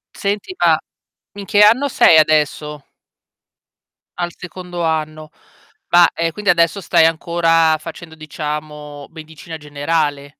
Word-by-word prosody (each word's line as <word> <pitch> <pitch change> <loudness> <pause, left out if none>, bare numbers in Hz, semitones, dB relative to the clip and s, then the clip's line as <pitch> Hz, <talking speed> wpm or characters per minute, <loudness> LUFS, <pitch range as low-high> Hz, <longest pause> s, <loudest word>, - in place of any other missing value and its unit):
Senti 205 - -4
ma, - - +4 0.6
in 200 - -6
che 205 0 +3
anno 245 +7 +4
sei 160 -9 +5
adesso? 150 -1 0 1.3
Al 175 -1 -2
secondo 175 -1 -8
anno. 155 -1 -3 0.6
Ma, 175 -1 +6
ehm, 165 0 -2
quindi 205 +2 -4
adesso 170 +3 +1
stai 160 - +3
ancora, 165 -1 +1
facendo 160 0 -10
diciamo, 150 -2 -7
medicina 160 0 -11
generale. 145 -1 -3
160 Hz, 115 wpm, -17 LUFS, 150-175 Hz, 1.3 s, Ma